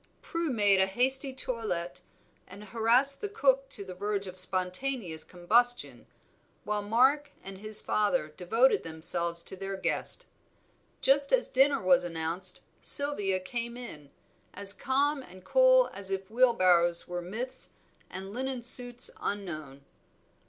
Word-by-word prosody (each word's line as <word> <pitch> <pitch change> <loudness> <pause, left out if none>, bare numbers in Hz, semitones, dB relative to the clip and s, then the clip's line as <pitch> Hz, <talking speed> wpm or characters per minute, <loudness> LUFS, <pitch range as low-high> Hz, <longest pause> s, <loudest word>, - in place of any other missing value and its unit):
Prue 335 -1 -3
made 205 -6 +2
a 190 - +2
hasty 265 +6 +1
toilet 225 -9 -4 0.5
and 200 +3 -12
harassed 235 - +2
the 415 - -4
cook 270 -7 +1
to 200 - -1
the 185 - -8
verge 200 +2 -3
of 185 -1 -6
spontaneous 185 0 -1
combustion, 235 +8 +1 0.6
while 210 0 -2
Mark 260 +8 +2
and 195 0 -10
his 215 +1 +4
father 210 - 0
devoted 225 +11 +1
themselves 170 +1 +2
to - - -9
their 195 +1 -6
guest. 190 - -2 0.8
Just 275 +1 +3
as - - +2
dinner 275 0 +2
was 180 -1 +4
announced 170 +2 -4 0.2
Sylvia 205 -10 +1
came 235 +5 -6
in, 150 - -10 0.5
as 200 0 +4
calm 280 +4 -1
and 185 -6 -15
cool - - +4
as 195 -1 -3
if 195 +1 -5
wheelbarrows 185 -8 +2
were 175 0 -5
myths 225 +9 -7 0.4
and 190 +2 -8
linen 260 0 -4
suits 245 0 +2
unknown. 155 -9 -6
205 Hz, 135 wpm, -28 LUFS, 185-260 Hz, 0.8 s, his